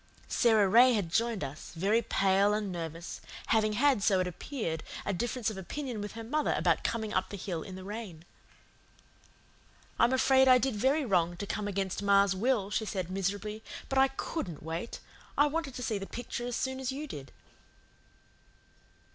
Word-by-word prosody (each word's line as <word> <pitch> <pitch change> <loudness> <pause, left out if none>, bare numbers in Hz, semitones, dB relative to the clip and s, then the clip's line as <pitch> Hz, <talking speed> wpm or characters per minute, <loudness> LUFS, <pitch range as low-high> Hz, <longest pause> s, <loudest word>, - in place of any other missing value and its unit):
Sara 220 -4 +4
Ray 245 +6 +7
had 195 -7 -1
joined 230 -2 +1
us, 140 +3 -7
very 200 +7 +2
pale 195 0 +3
and 210 -2 -2
nervous, 165 0 -6 0.3
having 215 -1 +3
had, 260 0 +3
so 195 -2 +3
it 185 - +1
appeared, 180 - -4 0.2
a 200 - 0
difference 235 +3 -1
of 195 - -7
opinion 245 +3 -5
with 205 - -5
her 225 0 -7
mother 300 +7 0
about - - +2
coming 220 -2 -2
up 185 - 0
the 200 - -6
hill 175 -3 -4
in 185 +3 -8
the 185 - -8
rain. 195 -5 -7 1.7
"I'm 235 - +5
afraid 265 0 +5
I 255 -1 +8
did 255 -2 0
very 270 +7 +2
wrong 175 -5 +1
to 200 - -4
come 210 0 -3
against 195 -1 -2
ma's 200 -1 +4
will," 210 -1 +1
she 220 - 0
said 185 -4 -3
miserably, 205 +3 -2 0.3
"but 270 - +2
I 270 - +6
COULDN'T 270 - -5
wait. 165 +8 -4 0.4
I 290 - +6
wanted 295 -3 -2
to 250 - -5
see 220 -3 -1
the 195 - -6
picture 240 0 -5
as 245 - -2
soon 260 0 -2
as 265 0 -2
you 285 +3 -4
did." 140 - -8
210 Hz, 180 wpm, -30 LUFS, 190-245 Hz, 1.7 s, I